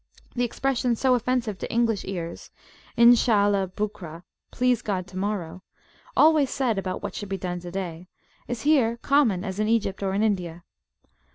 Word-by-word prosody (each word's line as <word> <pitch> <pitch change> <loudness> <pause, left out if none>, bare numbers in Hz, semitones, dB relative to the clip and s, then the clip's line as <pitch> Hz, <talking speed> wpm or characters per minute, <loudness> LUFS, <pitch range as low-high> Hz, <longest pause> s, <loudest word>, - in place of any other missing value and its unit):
The 245 - -1
expression, 245 0 0
so 260 +2 +2
offensive 245 -4 -1
to - - -5
English 230 -3 +1
ears, 170 -3 -6 0.5
Inshallah 205 -5 +4
BukraPlease 205 +5 -3
God, 190 -4 -2
tomorrowalways 195 - -1
said 245 -7 0
about 185 -1 -4
what - - -4
should 205 - -6
be 195 - -2
done 180 -1 -4
to 175 0 -8
day, 175 -2 -5 0.4
is 240 -2 -4
here 260 -6 +3
common 245 -11 +3
as 190 -1 -5
in 215 - +1
Egypt 215 -4 0
or 195 -1 -1
in 205 - +1
India. 175 -5 -1
205 Hz, 150 wpm, -25 LUFS, 185-240 Hz, 0.5 s, Inshallah